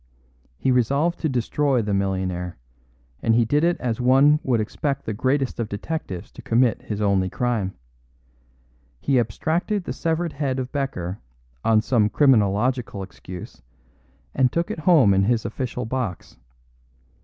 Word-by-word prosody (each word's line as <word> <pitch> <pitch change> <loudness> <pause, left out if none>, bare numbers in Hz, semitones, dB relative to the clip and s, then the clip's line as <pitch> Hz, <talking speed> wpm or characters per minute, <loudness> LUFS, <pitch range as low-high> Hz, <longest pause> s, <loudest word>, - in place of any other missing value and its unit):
He 130 - +1
resolved 140 +8 +1
to 160 - 0
destroy 130 0 +1
the 105 -1 -2
millionaire, 95 -2 -2 0.6
and 115 - +2
he 120 0 +4
did 145 +7 +1
it 175 +1 +2
as 120 -1 -2
one 135 +4 +5
would 125 -4 +1
expect 140 +6 -2
the 110 - -2
greatest 130 +4 0
of 115 -2 -2
detectives 100 - -5
to - - -11
commit 120 0 +2
his 105 -1 -5
only 100 -2 +2
crime. 110 -4 -1 1.2
He 135 - +2
abstracted 165 - -1
the - - -4
severed 165 0 -1
head 135 -2 -2
of 130 -1 -4
Becker 100 - -3 0.4
on 110 -1 +4
some 110 -5 +2
criminological 115 -4 +2
excuse, 90 -1 -10 0.7
and 130 -2 +2
took 170 +3 -1
it - - -5
home 150 - +5
in 95 0 +3
his 115 0 +1
official 125 +1 -3
box. 115 -6 -4
125 Hz, 145 wpm, -23 LUFS, 105-140 Hz, 1.2 s, one